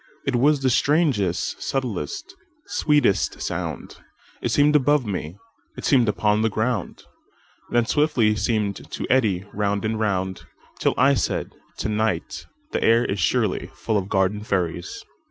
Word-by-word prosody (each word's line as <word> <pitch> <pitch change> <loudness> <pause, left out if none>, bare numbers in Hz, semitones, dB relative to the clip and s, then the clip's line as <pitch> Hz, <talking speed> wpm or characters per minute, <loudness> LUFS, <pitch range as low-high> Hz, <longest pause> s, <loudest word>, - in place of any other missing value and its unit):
It 135 - 0
was 145 +4 +3
the 130 -1 +2
strangest, 130 - +1
subtlest, 310 - -3 0.3
sweetest 150 - +1
sound:It - - -6
seem'd 145 +1 +3
above 145 -1 +3
me, 90 -4 -4 0.4
seem'd 125 -5 +3
upon 105 0 +1
the 110 - +2
ground, 110 -2 -2 0.7
Then 120 -1 +2
swiftly 120 -6 +2
seem'd 105 -3 -1
to - - -4
eddy 105 -8 +2
round 100 0 -1
and 110 0 -1
round, 95 -3 -1 0.4
Till - - +1
I - - +5
said: - - -1 0.2
"To - - -2
night 110 +1 -2 0.2
the - - -1
air 115 +2 +4
isSurely 100 -3 0
full 110 - -2
of 100 -1 -1
garden 95 +2 +1
fairies." 90 -4 -3
110 Hz, 135 wpm, -23 LUFS, 100-135 Hz, 0.7 s, I